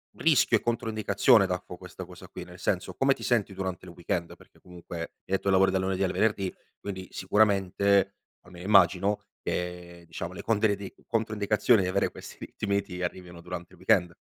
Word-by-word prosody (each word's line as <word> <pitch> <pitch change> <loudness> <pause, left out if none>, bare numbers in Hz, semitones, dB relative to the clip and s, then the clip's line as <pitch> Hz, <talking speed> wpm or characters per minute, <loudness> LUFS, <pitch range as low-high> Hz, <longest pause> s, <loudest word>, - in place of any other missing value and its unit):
rischio 150 -7 +4
e - - -8
controindicazione 110 -1 +3
danno 90 -1 -4
questa - - -9
cosa - - -12
qui? - - -7
Nel - - -13
senso, - - -1
come 135 0 +3
ti - - -11
senti 110 -5 +1
durante 95 -1 -4
il 90 - -10
weekend? 85 -1 -3
Perché - - -21
comunque 85 -1 -9
hai 85 - -3 0.2
detto 95 0 -1
che 100 - +1
lavori 95 0 +5
dal 95 - +1
lunedì 95 0 0
al 95 - +1
venerdì, 100 -4 0 0.3
quindi 95 -2 -6
sicuramente, 100 -1 +2 0.3
almeno 90 +1 -12
immagino, 100 0 +4 0.2
che 90 -1 -4
diciamo 85 +1 -5
le 90 - -7
controindi 105 -3 0
le - - -25
controindicazioni 110 -1 +2
di 90 - 0
avere 100 +2 +1
questi - - -11
ritmi, 100 -1 -1
ti 90 -2 -7
arrivino 90 -1 -5
durante 90 0 -7
il - - -16
weekend. 85 0 +2
95 Hz, 185 wpm, -28 LUFS, 90-105 Hz, 0.3 s, lavori